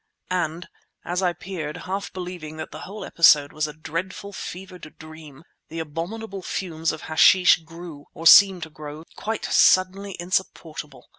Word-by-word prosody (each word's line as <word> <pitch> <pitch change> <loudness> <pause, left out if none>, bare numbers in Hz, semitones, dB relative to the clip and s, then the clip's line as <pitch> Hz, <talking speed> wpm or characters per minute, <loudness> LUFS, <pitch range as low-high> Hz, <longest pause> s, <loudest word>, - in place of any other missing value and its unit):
And 175 -1 -2 0.4
as 180 +2 -1
I 180 -2 +2
peered, 165 -5 -6
half 195 +3 -4
believing 175 -4 -7
that 160 - -7
the - - -8
whole 205 +2 -8
episode 150 -4 +5
was 155 0 -1
a 150 - -8
dreadful, 170 +6 -6
fevered 180 -4 -9
dream, 155 -2 -12 0.3
the 165 - -8
abominable 185 +6 -5
fumes 165 -3 -2
of - - -8
hashish 180 +3 +5
grew, 165 -2 -11
or 165 - -8
seemed 190 0 +8
to 160 - -9
grow, 150 +1 -9
quite 220 0 -4
suddenly 190 +1 +3
insupportable. 165 -6 -4
170 Hz, 150 wpm, -24 LUFS, 155-185 Hz, 0.4 s, seemed